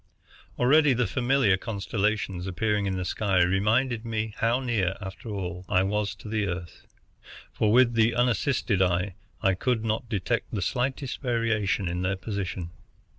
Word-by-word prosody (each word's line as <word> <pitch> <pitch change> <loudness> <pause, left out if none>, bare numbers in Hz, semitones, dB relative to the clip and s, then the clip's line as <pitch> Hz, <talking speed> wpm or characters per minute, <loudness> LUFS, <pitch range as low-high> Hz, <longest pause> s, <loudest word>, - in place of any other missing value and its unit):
Already 145 +3 +5
the 125 0 +1
familiar 120 -1 +2
constellations 100 -3 -2
appearing 100 +2 0
in 95 -1 -1
the 90 - -3
sky 100 +1 0
reminded 110 +6 +1
me 110 -2 -3
how 115 +3 +2
near, 110 -8 0
after 95 +3 -8
all, 90 -3 -4
I 95 0 +3
was 105 +1 -1
to 105 - -12
the 105 -1 -1
Earth, 85 -2 -6 0.7
for 105 - +1
with 120 0 +5
the 115 0 +3
unassisted 120 -4 +1
eye 90 +1 +1 0.3
I 95 -2 +4
could 115 +4 -1
not 110 +1 -2
detect 115 +2 -2
the 100 - -1
slightest 130 +4 -2
variation 115 -6 0
in 90 +1 -2
their 95 +1 0
position. 95 -4 -4
105 Hz, 155 wpm, -27 LUFS, 95-120 Hz, 0.7 s, Already